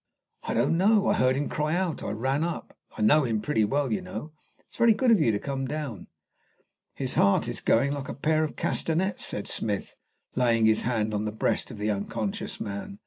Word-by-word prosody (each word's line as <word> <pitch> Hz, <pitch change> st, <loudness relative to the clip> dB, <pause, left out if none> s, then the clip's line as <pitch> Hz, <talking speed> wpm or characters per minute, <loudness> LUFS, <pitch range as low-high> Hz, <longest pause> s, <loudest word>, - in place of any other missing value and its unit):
"I -, -, -3 dB
don't 165 Hz, -, +2 dB
know. 205 Hz, +2 st, +4 dB
I -, -, +4 dB
heard 130 Hz, 0 st, +2 dB
him 145 Hz, +2 st, -1 dB
cry 155 Hz, +1 st, -1 dB
out. 180 Hz, -4 st, -1 dB
I -, -, -4 dB
ran 130 Hz, +8 st, -1 dB
up. 170 Hz, 0 st, -4 dB, 0.2 s
I 110 Hz, -, -1 dB
know 150 Hz, +8 st, +5 dB
him 115 Hz, -4 st, 0 dB
pretty 110 Hz, 0 st, +1 dB
well, 135 Hz, +3 st, 0 dB
you -, -, -1 dB
know. 150 Hz, +9 st, -7 dB, 0.3 s
It -, -, -33 dB
is -, -, -20 dB
very 235 Hz, -1 st, +5 dB
good 245 Hz, +2 st, +2 dB
of 220 Hz, -, +5 dB
you 135 Hz, -8 st, +3 dB
to 105 Hz, -, 0 dB
come 135 Hz, +3 st, -3 dB
down." 135 Hz, -, -5 dB, 0.9 s
"His 130 Hz, -2 st, -3 dB
heart 100 Hz, -, +3 dB
is -, -, -4 dB
going 140 Hz, +5 st, +2 dB
like 140 Hz, -2 st, -5 dB
a -, -, -5 dB
pair 155 Hz, +3 st, +1 dB
of 155 Hz, -, -4 dB
castanets," 180 Hz, +4 st, -1 dB
said 100 Hz, -, 0 dB
Smith, 105 Hz, -2 st, -2 dB, 0.4 s
laying 115 Hz, -3 st, +3 dB
his 110 Hz, 0 st, +4 dB
hand 110 Hz, -3 st, -1 dB
on 105 Hz, +1 st, -1 dB
the 105 Hz, -, -2 dB
breast 110 Hz, -, 0 dB
of -, -, -9 dB
the 105 Hz, +1 st, 0 dB
unconscious 105 Hz, +1 st, -3 dB
man. 100 Hz, -, -6 dB
130 Hz, 220 wpm, -27 LUFS, 110-155 Hz, 0.9 s, know